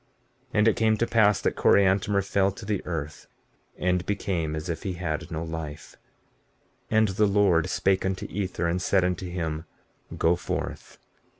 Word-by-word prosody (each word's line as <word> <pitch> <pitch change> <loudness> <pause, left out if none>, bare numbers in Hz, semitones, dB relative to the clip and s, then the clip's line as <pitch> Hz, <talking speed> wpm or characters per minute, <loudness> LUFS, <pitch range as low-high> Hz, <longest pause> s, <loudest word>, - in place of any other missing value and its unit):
15:32 - - -40 0.5
And 105 +1 +4
it 110 - +4
came 110 -1 +2
to 115 - +1
pass 105 -4 +3
that - - 0
Coriantumr 100 +1 +3
fell 100 0 +2
to 100 +3 -10
the 105 -2 -2
earth, 75 -5 -5 0.5
and 90 0 +1
became 90 -6 -1
as 80 +1 -5
if 80 -2 -3
he 95 - -3
had 85 -3 -4
no 80 0 -4
life. 80 -2 -7 0.9
15:33 110 - +1
And 110 0 +5
the 105 +2 +2
Lord 100 -5 +3
spake 95 -1 +1
unto 95 -1 -2
Ether, 95 -3 -3
and 85 +2 0
said 95 0 +2
unto 90 0 -2
him: 80 -3 -3 0.5
Go 85 +2 +3
forth. 85 - -5
90 Hz, 175 wpm, -26 LUFS, 85-100 Hz, 0.9 s, And